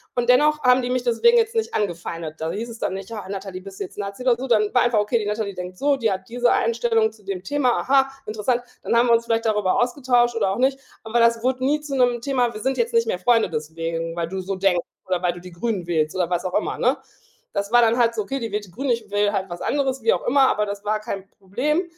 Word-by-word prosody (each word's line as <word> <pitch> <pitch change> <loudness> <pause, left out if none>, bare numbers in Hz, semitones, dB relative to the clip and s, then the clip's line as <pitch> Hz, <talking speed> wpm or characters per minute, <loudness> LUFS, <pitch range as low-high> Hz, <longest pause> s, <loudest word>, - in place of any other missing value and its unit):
Und 245 -1 0
dennoch 300 +4 +4
haben 250 0 +5
die 245 - -3
mich 250 -1 0
deswegen 250 - +4
jetzt 455 0 +2
nicht 450 -1 -1
angefeindet. 170 -5 -4
Da 160 - -1
hieß 225 +3 -4
es 230 -1 -10
dann - - -2
nicht: 195 +3 -8
„Ah, 210 -4 -6
Natalie, 195 -2 -6
bist 195 0 -11
du - - -2
jetzt 185 - -11
Nazi 200 +4 -5
oder 250 -2 +4
so?“ 265 - -5
Dann 215 -4 +2
war 250 - +4
einfach: 240 -2 +2
„Okay, 210 +3 +1
die 210 - -3
Natalie 210 -1 -2
denkt 180 0 -7
so, 280 +3 +2
die 225 -5 +1
hat 190 0 -4
diese 245 +1 +2
Einstellung 225 -1 +2
zu 215 -1 -21
dem 190 -2 -5
Thema, 265 -1 +1
aha, 270 0 +3 0.2
interessant“. 220 +3 -1 0.2
Dann - - -1
haben 235 +1 +4
wir 235 - +5
uns 230 0 +2
vielleicht 230 0 0
darüber 210 -4 +1
ausgetauscht 245 -1 +2
oder 210 -4 +1
auch 195 - -2
nicht. 265 +2 +1 0.2
Aber 230 +2 0
das 230 0 +3
wurde 255 0 0
nie 290 +3 +2
zu 290 -2 -5
'nem 245 -2 +2
Thema, 245 -2 0
„Wir 215 - -6
sind 265 +1 -1
jetzt 475 +1 0
nicht 460 0 +3
mehr 470 - -1
Freunde 235 -5 +3
deswegen, 165 +2 -4
weil 170 -1 -2
du 190 +3 -5
so 195 +1 -3
denkst“, 185 -2 +2 0.2
oder 185 -1 -1
„Weil 175 -1 +1
du 175 - -11
die 180 0 -11
Grünen 190 +1 -3
wählst“, 155 -2 0
oder 180 -2 0
was 175 0 -1
auch 180 - -3
immer, - - -1
ne? - - +2 0.6
Das 200 +1 -2
war 240 0 +6
dann 230 0 +3
halt 235 -1 +3
so: 215 - -1
„Okay, 270 +6 -4
die 230 -3 -4
wählt 210 0 -2
die 185 - -18
Grünen, 270 +9 -4
ich 225 -3 -2
wähle 205 0 +2
halt 195 -2 -1
was 175 - -7
anderes“, 270 -2 -1
wie 225 - +4
auch - - -3
immer, 270 +1 +4
aber 210 0 +1
das 200 0 -6
war 215 +1 0
kein 195 -2 -6
Problem. 250 - -1
225 Hz, 275 wpm, -22 LUFS, 195-250 Hz, 0.6 s, war